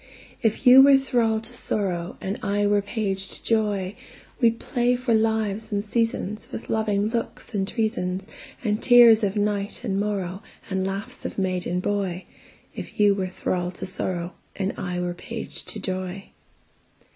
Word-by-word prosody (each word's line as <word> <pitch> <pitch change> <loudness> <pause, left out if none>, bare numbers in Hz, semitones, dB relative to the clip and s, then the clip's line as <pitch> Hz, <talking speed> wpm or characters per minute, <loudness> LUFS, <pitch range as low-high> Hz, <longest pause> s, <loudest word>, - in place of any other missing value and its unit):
If 225 +3 0
you 255 +1 +10
were 275 0 +8
thrall 235 -4 +1
to 225 +2 -10
sorrow, 185 -7 -2
And 195 +2 -3
I 205 0 +1
were 205 0 +3
page 195 -2 -3
to - - -14
joy, 210 -3 0 0.4
We'd 230 -2 +3
play 245 0 +1
for 245 -1 0
lives 220 -1 0
and 200 -1 0
seasonsWith 220 -1 -2
loving 215 -1 +1
looks 230 +1 -4
and 195 -2 0
treasonsAnd 210 0 -3
tears 240 -3 +7
of 200 0 0
night 205 +1 -1
and 195 -5 -1
morrowAnd 195 -2 -2 0.5
laughs 195 +2 -5
of - - -5
maid 185 -2 -1
and 180 +1 -1
boy; 195 -3 -1 0.5
If - - -8
you 205 -1 +6
were 190 -2 -2
thrall 180 -1 -2
to - - -6
sorrow, 180 -1 -3 0.2
And 195 0 -1
I 180 -1 -3
were 175 0 -2
page 230 +6 -7
to 215 - -7
joy. 185 0 -4
205 Hz, 155 wpm, -25 LUFS, 190-225 Hz, 0.5 s, you